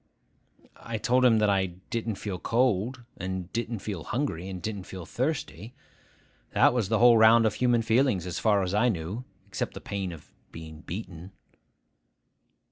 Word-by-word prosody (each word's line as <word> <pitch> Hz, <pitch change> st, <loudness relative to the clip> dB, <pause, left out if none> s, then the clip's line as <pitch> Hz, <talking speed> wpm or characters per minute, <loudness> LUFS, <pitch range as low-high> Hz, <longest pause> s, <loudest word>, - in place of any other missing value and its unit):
I 115 Hz, -1 st, -5 dB
told 125 Hz, +3 st, +2 dB
him 120 Hz, -3 st, +6 dB
that 105 Hz, -1 st, +3 dB
I 95 Hz, -1 st, +2 dB, 0.2 s
didn't 115 Hz, -2 st, -2 dB
feel 95 Hz, -2 st, -5 dB
cold, 120 Hz, +2 st, 0 dB
and 95 Hz, -1 st, -5 dB
didn't 115 Hz, -2 st, -3 dB
feel 95 Hz, -7 st, -4 dB
hungry, 110 Hz, -, -2 dB
and 95 Hz, -1 st, -5 dB
didn't 100 Hz, -1 st, -5 dB
feel 95 Hz, -3 st, -8 dB
thirsty. 120 Hz, -, -3 dB, 0.8 s
That -, -, +5 dB
was 115 Hz, -6 st, 0 dB
the 110 Hz, -, +2 dB
whole 120 Hz, 0 st, +6 dB
round 115 Hz, +1 st, +7 dB
of 110 Hz, -, +2 dB
human 120 Hz, -1 st, +2 dB
feelings, 115 Hz, -5 st, +2 dB
as 90 Hz, 0 st, -4 dB
far 105 Hz, -3 st, +3 dB
as 90 Hz, +1 st, -2 dB
I 110 Hz, +4 st, +3 dB
knew, 100 Hz, +5 st, -4 dB, 0.2 s
except 95 Hz, -2 st, -4 dB
the -, -, -6 dB
pain 100 Hz, -2 st, -4 dB
of 80 Hz, -3 st, -13 dB, 0.2 s
being 80 Hz, -1 st, -10 dB
beaten. 90 Hz, -1 st, -8 dB
105 Hz, 165 wpm, -27 LUFS, 95-115 Hz, 0.8 s, round